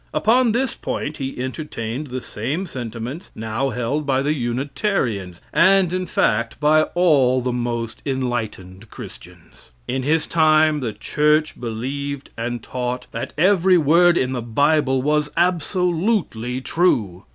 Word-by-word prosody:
Upon 235 +2 +3
this 245 +2 0
point 150 +2 -4
he 135 -1 -5
entertained 130 -1 -4
the 130 -1 -5
same 140 - -3
sentiments 125 - -6
now 110 +5 -2
held 125 +5 -2
by 135 -1 +1
the 150 +2 +1
Unitarians, 120 - -2
and 190 0 +4
in 185 0 -2
fact 115 -6 0
by 155 +1 +4
all 140 -8 +4
the 125 0 -2
most 120 -2 -3
enlightened 115 -7 -4
Christians. - - -12 0.2
In 130 +1 -1
his 155 +4 +1
time 155 -1 +3
the 120 -5 -2
church 150 +4 +1
believed 135 +5 -4
and 120 0 -4
taught 125 0 -4
that 130 - -5
every 185 +1 +4
word 170 +3 +4
in 130 0 0
the 125 -2 -2
Bible 135 +2 +2
was 150 +1 +1
absolutely 175 - 0
true. 110 - 0
135 Hz, 135 wpm, -21 LUFS, 120-160 Hz, 0.2 s, and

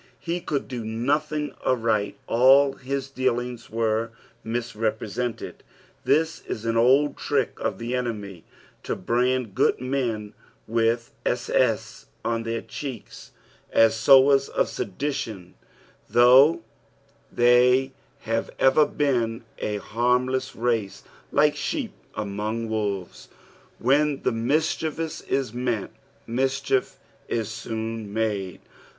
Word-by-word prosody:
Ho 170 +1 -1
could 150 -5 -3
"do 125 -3 -5
nothing 145 +7 -1
aright, 110 -4 0
all 135 +4 +5
his 135 0 -4
dealings 125 -2 -2
were 115 0 0 0.3
mis 120 +1 -3
repre»ented. 110 +2 -3 0.4
This 160 +1 +2
is 110 - -5
an 115 0 0
old 135 +5 +4
trick - - -1
of - - -2
the 120 +1 -4
enemy 105 -8 -4 0.4
to - - -3
brand 120 +2 0
good - - +2
men 120 -5 -2 0.3
with 115 +1 +1
8,8. - - 0 0.2
on 115 -1 0
their 115 0 -3
checks, 130 -7 -8 0.4
as 115 0 +5
sowers 135 +4 +5
of - - 0
sedition, 105 -5 -4 0.6
though 125 +2 +6 0.7
thry 125 +2 +4 0.3
have 115 0 -2
ever 145 +3 +5
been 120 -6 0 0.2
s 105 -1 -2
harmless 125 +3 0
race, 115 -4 -1 0.3
like 150 +1 +3
sheep 285 -8 -3 0.2
among 105 +3 -3
wolves. 100 -4 -3 0.5
When 145 +3 +2
mischief 150 +7 0
is 135 -6 -2
meant, 120 -4 -2 0.3
mischief 130 +1 0 0.3
is 115 -2 -2
soon 110 -1 -5
made. 105 -4 -2
120 Hz, 110 wpm, -25 LUFS, 110-135 Hz, 0.7 s, though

